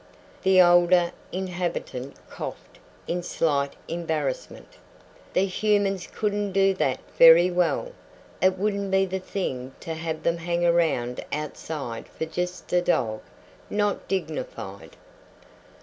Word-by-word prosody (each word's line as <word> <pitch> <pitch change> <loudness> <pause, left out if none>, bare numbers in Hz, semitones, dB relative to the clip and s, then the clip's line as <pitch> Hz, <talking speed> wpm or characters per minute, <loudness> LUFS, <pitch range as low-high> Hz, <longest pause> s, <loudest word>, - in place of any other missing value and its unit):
The 190 -1 +5
older 175 0 +6 0.2
inhabitant 175 -8 -4
coughed - - -8 0.3
in 175 +1 -1
slight 140 -5 0
embarrassment. 175 - -4 0.6
"The 190 - +3
humans 195 -1 +1
couldn't 205 -2 -2
do 195 0 +4
that 135 -8 0 0.2
very 165 +2 +9
well. 180 - +1 0.5
It 185 0 +3
wouldn't 200 0 -1
be 190 0 +3
the 190 0 -3
thing 135 -9 -4
to 165 - -4
have 160 0 -4
them 170 0 +1
hang 170 +1 -1
around 160 -8 +1
outside 150 -5 -5
for 160 - -5
just 180 +3 -4
a 180 - +4
dog 110 -11 0 0.5
not 205 -1 0
dignified." 155 - -5
175 Hz, 120 wpm, -25 LUFS, 160-190 Hz, 0.6 s, very